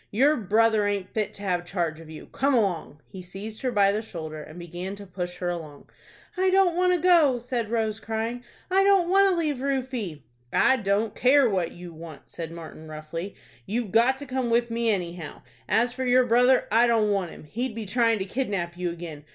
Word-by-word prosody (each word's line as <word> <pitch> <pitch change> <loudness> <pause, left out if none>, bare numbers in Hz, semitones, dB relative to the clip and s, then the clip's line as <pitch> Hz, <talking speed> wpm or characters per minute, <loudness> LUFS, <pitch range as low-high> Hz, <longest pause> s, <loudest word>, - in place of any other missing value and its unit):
Your 275 +8 +3
brother 220 -1 +2
aint 200 -2 -3
fit 215 -2 -1
to 200 - -9
have 180 -3 0
charge 170 -3 -2
of 165 -1 -12
you. 155 -1 -9
Come 275 +1 0
along." 180 -9 -1
He 190 - -9
seized 195 +5 -8
her 255 -2 -1
by 200 -3 +4
the 210 +2 -1
shoulder, 160 -7 -7
and 155 +2 -11
began 175 +3 -6
to 200 0 -10
push 180 -1 -5
her 180 0 -2
along. 155 -5 -7 0.4
"I 375 0 +2
don't 370 -2 +3
want 365 +1 +3
to 355 - +1
go," 325 -7 +5
said 240 -2 -3
Rose, 220 -2 -1
crying. 225 +3 -3 0.3
"I 385 +1 +4
don't 390 -3 +4
want 390 +1 +5
to 375 - +1
leave 310 -5 0
Rufie." 255 - -3 0.3
"I 265 - +4
don't 205 0 0
care 265 +1 +4
what 185 -6 -1
you 175 -1 -10
want," 160 -2 -11
said 165 -1 -6
Martin, 160 -1 -10
roughly."You've 170 +7 -6
got 240 +4 +4
to 285 - -8
come 260 -2 -2
with 235 0 +1
me, 230 0 0
anyhow. 175 -5 -3 0.3
As 240 +2 +2
for 260 - -4
your 250 0 +4
brother, 245 +2 +4
I 230 +3 +5
don't 220 -3 +2
want 195 -4 0
him. - - -12
He'd 230 - -4
be 225 -2 -5
trying 230 +2 +2
to 190 - -3
kidnap 195 -7 -2
you 180 0 -2
again. 165 -3 -8
215 Hz, 210 wpm, -26 LUFS, 175-250 Hz, 0.4 s, go